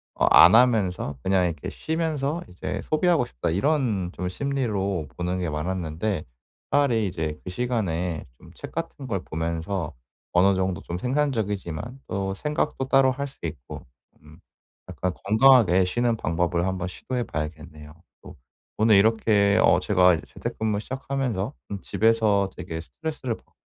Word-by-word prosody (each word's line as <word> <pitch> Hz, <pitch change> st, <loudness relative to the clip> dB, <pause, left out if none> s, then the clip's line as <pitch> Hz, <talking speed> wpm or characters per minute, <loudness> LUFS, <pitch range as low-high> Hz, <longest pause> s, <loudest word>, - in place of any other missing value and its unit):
어 -, -, +2 dB
안 -, -, +9 dB
하면서 100 Hz, -, +2 dB
그냥 95 Hz, -1 st, +2 dB
이렇게 80 Hz, -4 st, -3 dB
쉬면서 160 Hz, -1 st, -2 dB
이제 90 Hz, -, -5 dB
소비하고 160 Hz, -3 st, +2 dB
싶다.' 65 Hz, -, -4 dB
이런 105 Hz, -, 0 dB
좀 90 Hz, -, -4 dB
심리로 100 Hz, -, -2 dB
보는 90 Hz, +1 st, -2 dB
게 90 Hz, -3 st, -2 dB
많았는데 85 Hz, +3 st, -2 dB, 0.5 s
차라리 125 Hz, -7 st, +3 dB
이제 80 Hz, -4 st, -4 dB
그 -, -, -6 dB
시간에 90 Hz, -7 st, -2 dB
좀 -, -, -16 dB
책 -, -, -9 dB
같은 135 Hz, -, -5 dB
걸 95 Hz, -6 st, -2 dB
보면서 80 Hz, +1 st, -3 dB, 0.4 s
어느 95 Hz, +2 st, +4 dB
정도 95 Hz, -2 st, -1 dB
좀 85 Hz, -, -5 dB
생산적이지만 115 Hz, -, -2 dB
또 95 Hz, 0 st, -2 dB
생각도 150 Hz, 0 st, -2 dB
따로 135 Hz, -1 st, +4 dB
할 140 Hz, +2 st, -3 dB
수 140 Hz, -, -17 dB
있고 75 Hz, -6 st, -6 dB, 0.4 s
음. 75 Hz, +2 st, -17 dB, 0.5 s
약간 90 Hz, 0 st, -2 dB
건강하게 110 Hz, -4 st, +6 dB
쉬는 120 Hz, +4 st, +1 dB
방법을 85 Hz, -1 st, 0 dB
한 95 Hz, -, -1 dB
번 90 Hz, 0 st, -3 dB
시도해 125 Hz, +6 st, -4 dB
봐야겠네요. 75 Hz, -2 st, -6 dB, 0.3 s
또 -, -, -12 dB, 0.4 s
오늘 110 Hz, -1 st, +5 dB
이렇게 105 Hz, -1 st, +4 dB
어 -, -, +5 dB
제가 90 Hz, -3 st, +4 dB
이제 80 Hz, -, -7 dB
재택근무 110 Hz, -2 st, -3 dB
시작하면서 130 Hz, -3 st, -3 dB, 0.2 s
좀 100 Hz, -2 st, -5 dB
집에서 110 Hz, -3 st, +2 dB
되게 80 Hz, 0 st, -5 dB
스트레스를 145 Hz, -, -5 dB
받고 -, -, -29 dB
100 Hz, 320 characters per minute, -25 LUFS, 85-125 Hz, 0.5 s, 안